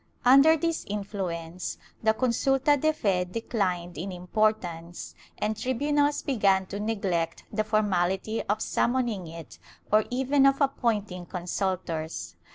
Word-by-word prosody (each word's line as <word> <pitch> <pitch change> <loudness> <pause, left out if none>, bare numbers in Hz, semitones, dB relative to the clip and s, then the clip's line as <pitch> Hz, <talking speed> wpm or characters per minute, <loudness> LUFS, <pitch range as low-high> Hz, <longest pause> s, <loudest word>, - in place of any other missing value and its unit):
Under 275 +6 +7
this 330 +1 -1
influence 185 -4 -4 0.2
the 220 0 +3
consulta 270 +4 +2
de 310 +3 +2
fe 195 -11 +1
decUned 180 -4 -2
in 190 +4 -4
importance, 180 -2 -2 0.2
and 215 +1 -1
tribunals 290 +5 +1
began 200 -7 +2
to 200 +2 -6
neglect 200 -6 -1
the 215 - +1
formality 205 -1 0
of 215 +1 +1
summoning 235 -7 0
it 165 -2 -10 0.3
or 215 0 +4
even 270 +2 +3
of 275 0 +3
appointing 215 - 0
consultors. 175 -3 -3
210 Hz, 120 wpm, -27 LUFS, 180-255 Hz, 0.3 s, Under